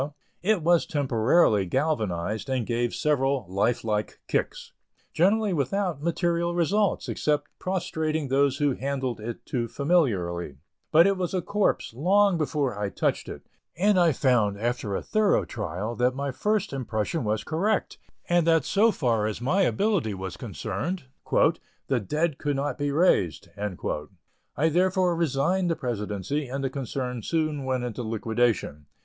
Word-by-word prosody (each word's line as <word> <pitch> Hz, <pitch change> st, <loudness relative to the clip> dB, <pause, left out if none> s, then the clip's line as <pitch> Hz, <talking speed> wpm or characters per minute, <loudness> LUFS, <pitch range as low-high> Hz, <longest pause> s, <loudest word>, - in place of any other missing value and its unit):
it 200 Hz, -3 st, +1 dB
was 170 Hz, 0 st, +3 dB
temporarily 125 Hz, -, +3 dB
galvanized, 110 Hz, -, -1 dB
and 130 Hz, -3 st, 0 dB
gave 120 Hz, +1 st, 0 dB
several 135 Hz, -4 st, +1 dB
life 100 Hz, +6 st, 0 dB
like 105 Hz, -1 st, -2 dB
kicks, -, -, -2 dB, 0.4 s
generally 205 Hz, +3 st, +3 dB
without 170 Hz, +2 st, -1 dB
material 170 Hz, +1 st, 0 dB
results, 195 Hz, +4 st, +1 dB
except 150 Hz, -1 st, 0 dB
prostrating 160 Hz, -5 st, -2 dB
those 135 Hz, 0 st, +2 dB
who 145 Hz, -1 st, +2 dB
handled 130 Hz, -2 st, -3 dB
it 115 Hz, +2 st, -7 dB
too 120 Hz, -3 st, -2 dB
familiarly; 100 Hz, -, 0 dB, 0.3 s
but 165 Hz, +2 st, +7 dB
it 195 Hz, -1 st, +2 dB
was 185 Hz, 0 st, -2 dB
a 185 Hz, -, +1 dB
corpse 205 Hz, -, 0 dB
long 195 Hz, -, +3 dB
before 145 Hz, -6 st, -1 dB
I 105 Hz, -1 st, -1 dB
touched -, -, -1 dB
it, -, -, -9 dB, 0.3 s
and 195 Hz, +1 st, +3 dB
I 170 Hz, -2 st, +5 dB
found, 120 Hz, -7 st, +2 dB
after 115 Hz, -3 st, -2 dB
a -, -, -3 dB
thorough 215 Hz, -2 st, +2 dB
trial, 105 Hz, +1 st, -4 dB
that 125 Hz, +2 st, +2 dB
my 140 Hz, 0 st, -2 dB
first 210 Hz, -, -1 dB
impression 120 Hz, +2 st, -2 dB
was 105 Hz, 0 st, -1 dB
correct, 195 Hz, +6 st, -1 dB, 0.3 s
and 175 Hz, -1 st, +2 dB
that 165 Hz, -4 st, +4 dB
so 215 Hz, +4 st, +4 dB
far 115 Hz, -, 0 dB
as 110 Hz, -, -4 dB
my 150 Hz, +11 st, +1 dB
ability 195 Hz, -, +1 dB
was 95 Hz, -1 st, -6 dB
concerned, 175 Hz, +6 st, -4 dB, 0.3 s
"the 130 Hz, -3 st, +1 dB
dead 150 Hz, -, -1 dB
could 145 Hz, -1 st, -1 dB
not 140 Hz, +2 st, -1 dB
be 145 Hz, 0 st, 0 dB
raised." 140 Hz, -, +2 dB, 1.1 s
I 155 Hz, +5 st, +3 dB
therefore 180 Hz, +1 st, +2 dB
resigned 170 Hz, +4 st, +1 dB
the 165 Hz, -, +1 dB
presidency 120 Hz, +3 st, -3 dB
and 135 Hz, +2 st, -4 dB
the 135 Hz, -, -1 dB
concern 125 Hz, -2 st, -4 dB
soon 155 Hz, -1 st, -1 dB
went 130 Hz, -1 st, -1 dB
into 125 Hz, -1 st, -4 dB
liquidation. 110 Hz, -9 st, -1 dB
140 Hz, 150 wpm, -26 LUFS, 115-170 Hz, 1.1 s, but